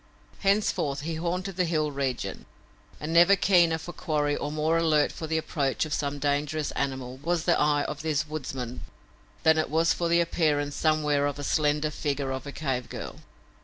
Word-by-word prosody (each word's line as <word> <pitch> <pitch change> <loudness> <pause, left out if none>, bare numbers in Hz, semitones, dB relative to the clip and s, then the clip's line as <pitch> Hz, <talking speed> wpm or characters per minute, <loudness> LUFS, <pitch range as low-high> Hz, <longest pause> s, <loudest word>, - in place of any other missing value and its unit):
Henceforth 195 -8 +1
he 165 +3 -3
haunted 180 +3 -3
the 180 - +3
hill 155 -3 0
region, 135 -3 -3 0.5
and 155 +2 -4
never 175 +4 +7
keener 175 -4 +4
for 170 +2 -8
quarry 150 -3 0
or 145 - -3
more 155 +2 +1
alert 160 -3 +3
for 160 - -6
the 160 +1 0
approach 145 -3 -1
of 155 - -4
some 145 -1 -1
dangerous 145 +2 -1
animal 130 -2 -3
was 165 +4 -1
the 175 - +4
eye 150 -1 +3
of 150 0 -5
this 155 -1 0
woodsman 130 -5 -5 0.6
than 160 0 +5
it 155 - 0
was 165 +2 +3
for 170 -1 -1
the 170 0 +4
appearance 150 -4 +1
somewhere 150 -2 +2
of 145 -1 -4
a 145 - -6
slender 150 +1 +1
figure 140 -3 -2
of 130 +2 -5
a - - -5
cave 135 -5 -3
girl. - - -7
150 Hz, 185 wpm, -27 LUFS, 145-165 Hz, 0.6 s, never